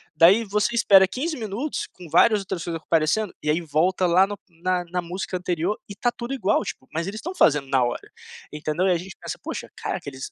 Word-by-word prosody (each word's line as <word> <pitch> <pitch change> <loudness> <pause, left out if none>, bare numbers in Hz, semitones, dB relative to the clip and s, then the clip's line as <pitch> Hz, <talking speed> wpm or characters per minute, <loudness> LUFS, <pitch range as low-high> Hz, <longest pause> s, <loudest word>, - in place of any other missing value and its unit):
Daí 180 +8 +6
você 210 +3 0
espera 195 -4 +6
15 295 - -3
minutos 230 +6 -3
com 180 -2 -12
várias 215 +6 +5
outras 190 -2 -4
coisas 165 -2 -4
aparecendo, 165 +7 +1
e 150 - -2
aí 160 +3 +2
volta 170 +4 +1
lá 180 +2 +5
no 205 0 -6
na 180 +2 -1
na 180 +1 -2
música 185 +2 -4
anterior, 180 +2 -2
e 200 - -7
tá 240 +4 0
tudo 240 +2 -6
igual, 210 -5 +1
tipo, 130 - -7
mas 165 +3 -2
eles 210 +2 -5
estão 355 +10 -5
fazendo 150 - +3
na 135 -1 +3
hora, 120 0 -3 0.4
entendeu. 155 +4 -1
E - - +4
a 175 - +3
gente 185 +2 -9
pensa: - - -6
"Poxa, - - -6
caraca, - - -4
eles 130 -1 -8
185 Hz, 220 wpm, -24 LUFS, 165-210 Hz, 0.4 s, Daí